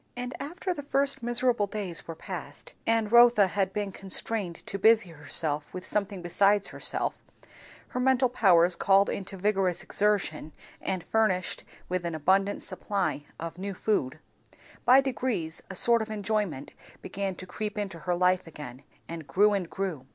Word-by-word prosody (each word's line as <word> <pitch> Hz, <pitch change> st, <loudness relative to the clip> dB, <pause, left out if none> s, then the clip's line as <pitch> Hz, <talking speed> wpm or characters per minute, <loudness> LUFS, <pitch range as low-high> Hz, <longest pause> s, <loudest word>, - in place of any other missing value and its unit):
And 250 Hz, +1 st, -5 dB
after 355 Hz, +5 st, -4 dB
the 290 Hz, -, -7 dB
first 280 Hz, -1 st, 0 dB
miserable 240 Hz, -2 st, +1 dB
days 195 Hz, -5 st, -4 dB
were 165 Hz, -, -6 dB
past, 160 Hz, -5 st, -8 dB
and 225 Hz, -2 st, +1 dB
Rotha 235 Hz, -3 st, +6 dB
had 190 Hz, +1 st, -1 dB
been 205 Hz, 0 st, -3 dB
constrained 195 Hz, -1 st, -3 dB
to 200 Hz, -, -5 dB
busy 220 Hz, -4 st, +4 dB
herself 150 Hz, -1 st, 0 dB
with 185 Hz, -, -7 dB
something 200 Hz, -3 st, -3 dB
besides 200 Hz, +3 st, +2 dB
herself; -, -, 0 dB, 0.8 s
her 250 Hz, -, -4 dB
mental 260 Hz, 0 st, +3 dB
powers 180 Hz, -7 st, +4 dB
called 195 Hz, 0 st, +3 dB
into 195 Hz, 0 st, -6 dB
vigorous 190 Hz, -2 st, 0 dB
exertion 200 Hz, -7 st, +1 dB, 0.3 s
and 185 Hz, -3 st, -3 dB
furnished 215 Hz, -5 st, 0 dB, 0.2 s
with 180 Hz, -1 st, -2 dB
an 170 Hz, -2 st, -3 dB
abundant 195 Hz, +6 st, +1 dB
supply 185 Hz, -5 st, -3 dB
of 165 Hz, +1 st, -7 dB
new 195 Hz, 0 st, -5 dB
food; 155 Hz, -10 st, -1 dB, 0.7 s
by 255 Hz, +2 st, +7 dB
degrees 245 Hz, -11 st, -3 dB
a 190 Hz, -, -7 dB
sort 235 Hz, +4 st, +9 dB
of 220 Hz, -, -5 dB
enjoyment 205 Hz, -8 st, -3 dB, 0.3 s
began 195 Hz, -1 st, -4 dB
to 185 Hz, -, -9 dB
creep 210 Hz, +3 st, -5 dB
into 195 Hz, -5 st, -4 dB
her 175 Hz, +2 st, -2 dB
life 180 Hz, 0 st, +1 dB
again, 140 Hz, -5 st, -10 dB, 0.3 s
and 165 Hz, -3 st, -8 dB
grew, 205 Hz, +2 st, +3 dB
and 185 Hz, -4 st, -2 dB
grew. 180 Hz, -10 st, -5 dB
195 Hz, 160 wpm, -27 LUFS, 175-215 Hz, 0.8 s, sort